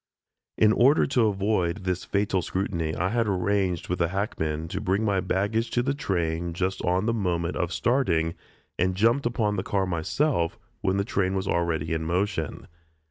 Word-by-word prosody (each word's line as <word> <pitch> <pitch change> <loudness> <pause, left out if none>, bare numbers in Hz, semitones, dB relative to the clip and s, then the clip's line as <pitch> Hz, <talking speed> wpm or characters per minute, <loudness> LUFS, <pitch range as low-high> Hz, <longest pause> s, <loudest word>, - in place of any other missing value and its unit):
In 110 -1 +5
order 135 +7 +5
to 125 -5 +2
avoid 100 -2 0
this 90 -1 -2
fatal 100 -2 0
scrutiny 85 -4 -2
I 90 +2 0
had 115 0 +1
arranged 95 -2 0
with 90 0 -2
a 85 - +3
hackman 80 -5 -2
to - - -3
bring 95 +4 +1
my 100 -2 +2
baggage 105 +5 0
to 120 - +4
the 135 +2 0
train 85 - -2
just 95 +2 -2
on 90 +3 +1
the 115 - +1
moment 90 -5 -1
of 90 -1 -1
starting, 85 -10 +1 0.5
and 90 +1 +1
jumped 115 +6 +3
upon 105 -3 0
the 95 - -1
car 95 -1 0
myself 85 - 0 0.2
when 95 +1 +1
the 100 - 0
train 95 -3 0
was 95 0 -2
already 80 -2 0
in 80 0 -1
motion. 90 -2 -1
95 Hz, 180 wpm, -26 LUFS, 85-105 Hz, 0.5 s, In